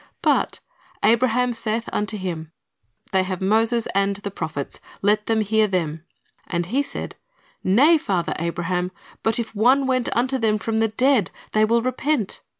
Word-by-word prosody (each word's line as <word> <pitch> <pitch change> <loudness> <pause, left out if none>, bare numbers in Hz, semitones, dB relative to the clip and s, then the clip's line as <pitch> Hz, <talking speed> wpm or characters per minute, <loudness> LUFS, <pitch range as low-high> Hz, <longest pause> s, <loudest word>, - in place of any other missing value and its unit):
But - - +1 0.4
"Abraham 245 +1 +3
saith 230 0 -2
unto 210 +1 -1
him. 165 -5 -5 0.6
They 190 - +3
have 185 -1 -3
Moses 225 +4 +2
and 200 0 +1
the 205 0 -6
prophets; 150 -6 -5 0.2
let 210 +1 +2
them 225 -1 +2
hear 215 +1 +2
them. 165 -4 -2 0.4
And 170 -1 -1
he 250 +10 +1
said. 285 - -6 0.5
Nay, 285 - +5
father 180 - -1
Abraham; 175 +2 -2 0.3
but 225 - +1
if 235 -2 -3
one 255 +6 +4
went 255 -2 +1
unto 260 +2 +1
them 215 -2 +2
from 220 +2 -1
the 225 - +3
dead, 240 -2 +2 0.2
they 215 0 +4
will 230 +1 +2
repent. 255 -2 -1
215 Hz, 155 wpm, -23 LUFS, 185-235 Hz, 0.6 s, Nay